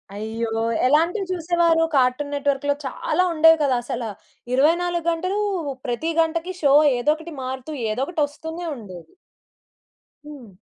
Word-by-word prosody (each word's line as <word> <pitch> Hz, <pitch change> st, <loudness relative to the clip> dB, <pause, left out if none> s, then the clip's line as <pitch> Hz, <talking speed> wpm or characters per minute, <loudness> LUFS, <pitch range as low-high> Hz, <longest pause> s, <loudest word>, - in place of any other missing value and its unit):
అయ్యో! 225 Hz, +2 st, -3 dB, 0.4 s
ఎలాంటివి 340 Hz, +8 st, +2 dB
చూసేవారు 335 Hz, -1 st, +2 dB
కార్టూన్ 265 Hz, +3 st, +1 dB
నెట్వర్క్‌లో 285 Hz, 0 st, 0 dB
చాలా 360 Hz, +7 st, 0 dB
ఉండేవి 325 Hz, 0 st, +6 dB
కదా! 265 Hz, -3 st, +2 dB
అసల 240 Hz, 0 st, -4 dB, 0.5 s
24 340 Hz, +5 st, +2 dB
గంటలు 370 Hz, +5 st, -2 dB, 0.5 s
ప్రతి 270 Hz, +7 st, -2 dB
గంటకి 330 Hz, +3 st, -2 dB
షో 280 Hz, -2 st, +4 dB, 0.2 s
ఏదోకటి 310 Hz, +6 st, -1 dB
మారుతూ 260 Hz, +3 st, -5 dB, 0.2 s
ఏదోకటి 275 Hz, +8 st, -2 dB
వస్తూనే 320 Hz, +4 st, -7 dB
ఉండేది. 185 Hz, -, -11 dB, 1.1 s
హ్మ్. 265 Hz, -9 st, -11 dB
300 Hz, 115 wpm, -22 LUFS, 255-335 Hz, 1.1 s, ఉండేవి